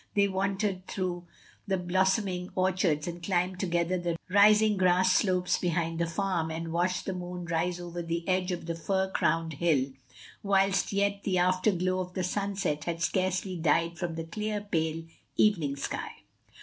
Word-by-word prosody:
They 200 Hz, 0 st, +4 dB
wandered 195 Hz, 0 st, -1 dB
through 180 Hz, -2 st, -3 dB, 0.4 s
the 190 Hz, -1 st, +1 dB
blossoming 185 Hz, +1 st, 0 dB
orchards 185 Hz, -5 st, +1 dB
and 175 Hz, 0 st, -5 dB
climbed 180 Hz, 0 st, 0 dB
together 175 Hz, 0 st, 0 dB
the 170 Hz, -1 st, -2 dB
rising 210 Hz, +2 st, +6 dB
grass 185 Hz, 0 st, +3 dB
slopes 185 Hz, -2 st, +2 dB
behind 165 Hz, -2 st, -1 dB
the 170 Hz, -, +1 dB
farm, 170 Hz, -1 st, -1 dB
and 165 Hz, +1 st, -4 dB
watched 180 Hz, +2 st, 0 dB
the 190 Hz, -, -2 dB
moon 180 Hz, -1 st, -6 dB
rise 170 Hz, +1 st, -1 dB
over 175 Hz, 0 st, -5 dB
the 170 Hz, 0 st, -3 dB
edge 185 Hz, 0 st, +1 dB
of 175 Hz, -2 st, -4 dB
the 170 Hz, -, -2 dB
fir 190 Hz, +3 st, -1 dB
crowned 165 Hz, -2 st, +1 dB
hill, 140 Hz, -4 st, +1 dB, 0.5 s
whilst 195 Hz, -1 st, +2 dB
yet 200 Hz, 0 st, +1 dB
the 190 Hz, -2 st, 0 dB
afterglow 185 Hz, 0 st, +2 dB
of 180 Hz, 0 st, -5 dB
the 185 Hz, -, -1 dB
sunset 195 Hz, -6 st, -1 dB
had 170 Hz, -1 st, -2 dB
scarcely 185 Hz, +1 st, 0 dB
died 165 Hz, +1 st, +1 dB
from 175 Hz, -2 st, -3 dB
the 165 Hz, -, -3 dB
clear, 210 Hz, +5 st, -3 dB
pale, 165 Hz, -5 st, -1 dB, 0.3 s
evening 165 Hz, -10 st, +3 dB
sky. 140 Hz, -, -4 dB
180 Hz, 160 wpm, -29 LUFS, 170-190 Hz, 0.5 s, rising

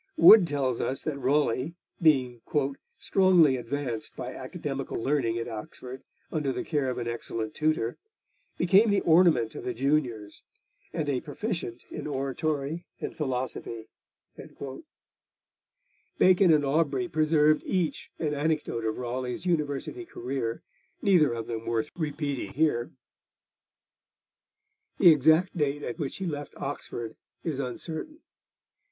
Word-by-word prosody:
Wood 215 Hz, -, +9 dB
tells 135 Hz, -5 st, -1 dB
us 135 Hz, -, -2 dB
that 150 Hz, -3 st, -3 dB
Raleigh, 140 Hz, +2 st, +1 dB, 0.3 s
being 130 Hz, -7 st, +3 dB, 0.6 s
'strongly 180 Hz, -8 st, +4 dB
advanced 125 Hz, -2 st, -4 dB
by -, -, -5 dB
academical -, -, -5 dB
learning 120 Hz, -3 st, 0 dB
at 115 Hz, -, -3 dB
Oxford, 125 Hz, +3 st, -8 dB, 0.3 s
under 150 Hz, -4 st, 0 dB
the -, -, -3 dB
care 145 Hz, -5 st, 0 dB
of 125 Hz, -, -3 dB
an 120 Hz, -1 st, -3 dB
excellent 115 Hz, -2 st, -4 dB
tutor, 155 Hz, -7 st, 0 dB, 0.6 s
became 195 Hz, +6 st, +5 dB
the 200 Hz, -1 st, +3 dB
ornament 160 Hz, -9 st, +4 dB
of -, -, -7 dB
the 125 Hz, -, -3 dB
juniors, 125 Hz, -6 st, -1 dB, 0.5 s
and 160 Hz, -3 st, -2 dB
a 135 Hz, -3 st, 0 dB
proficient 170 Hz, -, -4 dB
in -, -, -5 dB
oratory 145 Hz, +3 st, -2 dB
and -, -, -5 dB
philosophy.' 125 Hz, -6 st, -3 dB, 2.3 s
Bacon 185 Hz, -1 st, +6 dB
and 150 Hz, -2 st, +4 dB
Aubrey 160 Hz, +5 st, +1 dB
preserved 155 Hz, -2 st, +3 dB
each 180 Hz, -4 st, -1 dB
an 150 Hz, -2 st, -1 dB
anecdote 150 Hz, -5 st, -1 dB
of 110 Hz, -1 st, -1 dB
Raleigh's 125 Hz, +5 st, -4 dB
university 165 Hz, -, -1 dB
career, 120 Hz, -, -4 dB, 0.4 s
neither 175 Hz, -8 st, +5 dB
of 115 Hz, -1 st, -4 dB
them 115 Hz, -1 st, -5 dB
worth 115 Hz, -1 st, -1 dB
repeating 145 Hz, -4 st, -3 dB
here. 140 Hz, -5 st, +1 dB, 2.1 s
The 175 Hz, -4 st, +8 dB
exact 160 Hz, +6 st, +4 dB
date 145 Hz, -2 st, 0 dB
at 120 Hz, -, -5 dB
which 140 Hz, -4 st, -3 dB
he 190 Hz, -, -4 dB
left 145 Hz, -4 st, -5 dB
Oxford 120 Hz, -5 st, -5 dB, 0.3 s
is 155 Hz, -5 st, -2 dB
uncertain. 160 Hz, -, -5 dB
145 Hz, 125 wpm, -28 LUFS, 125-160 Hz, 2.3 s, Wood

